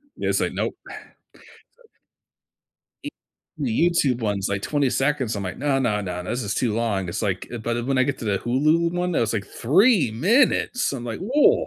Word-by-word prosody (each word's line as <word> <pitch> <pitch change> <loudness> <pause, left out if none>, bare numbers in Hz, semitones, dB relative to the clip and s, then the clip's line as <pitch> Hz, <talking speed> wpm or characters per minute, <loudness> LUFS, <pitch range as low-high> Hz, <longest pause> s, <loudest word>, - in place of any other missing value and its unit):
Yeah, - - -2
it's - - +1
like, - - -1
nope. - - -2
So - - -11 1.9
E - - -5 0.5
The 145 +5 +1
YouTube 135 -8 +1
one's, 100 -3 -1
like, 100 -1 -2
20 145 -4 0
seconds, 135 -5 0
I'm 100 - -4
like, 90 - -5
"No, 140 -1 +1
no, 105 -5 0
no, 90 -2 -4
this 120 +6 -3
is 100 -1 -3
too 115 -5 0
long." 105 -5 -1
It's 85 - -4
like, 95 -4 -2
uh, - - -4
but, 115 +1 -2
uh, 120 - -3
when 135 0 0
I - - +5
get 145 - -2
to - - -7
the 100 -3 0
Hulu 155 - +2
one 180 0 -1
that - - +1
was, 115 -1 0
like, 100 -3 -3
3 185 - +3
minutes, 230 - +2
I'm 120 -3 -5
like, 115 -2 -5
"Woah" 265 +10 +3
120 Hz, 210 wpm, -23 LUFS, 105-150 Hz, 1.9 s, I